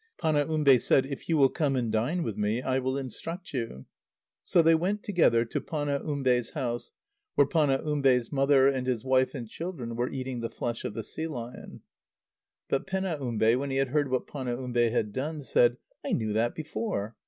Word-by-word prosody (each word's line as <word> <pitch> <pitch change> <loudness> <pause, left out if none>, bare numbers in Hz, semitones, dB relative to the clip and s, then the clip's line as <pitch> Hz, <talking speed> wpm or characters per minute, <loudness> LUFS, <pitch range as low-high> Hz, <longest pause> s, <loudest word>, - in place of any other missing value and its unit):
Panaumbe 150 -3 +3
said: 130 +3 +3
"If 140 +3 -7
you 165 - +3
will 135 -2 +6
come 145 -3 0
and 120 -3 0
dine 125 +11 0
with 110 - -3
me, 105 +3 0
I 130 +1 0
will 130 +1 -1
instruct 165 - -6
you." 115 - -4 0.6
So 170 - +4
they 165 +1 +6
went 190 +6 0
together 140 - +3
to 115 - -3
Panaumbe's 140 -5 0
house, 120 -2 -3 0.4
where 145 - +5
Panaumbe's 140 -4 +2
mother, 135 -1 +4
and 130 -2 0
his 125 -3 -1
wife 130 +1 +2
and 120 -4 -5
children, 135 -5 -6
were 120 +2 -1
eating 130 -2 -4
the 115 0 -3
flesh 120 -1 -4
of - - -4
the 115 - -3
sea 160 +8 -4
lion. 125 -6 -8 0.9
But 135 - -1
Penaumbe, 140 - +1
when 140 +1 -3
he 135 - -1
had 135 -1 +1
heard 145 0 +1
what 130 -1 0
Panaumbe 125 -3 -1
had 110 -3 -1
done, 150 +5 -3
said: 120 0 +3 0.3
"I - - -2
knew 110 -2 0
that 115 +2 +1
before." 155 - -3
130 Hz, 180 wpm, -28 LUFS, 120-150 Hz, 0.9 s, will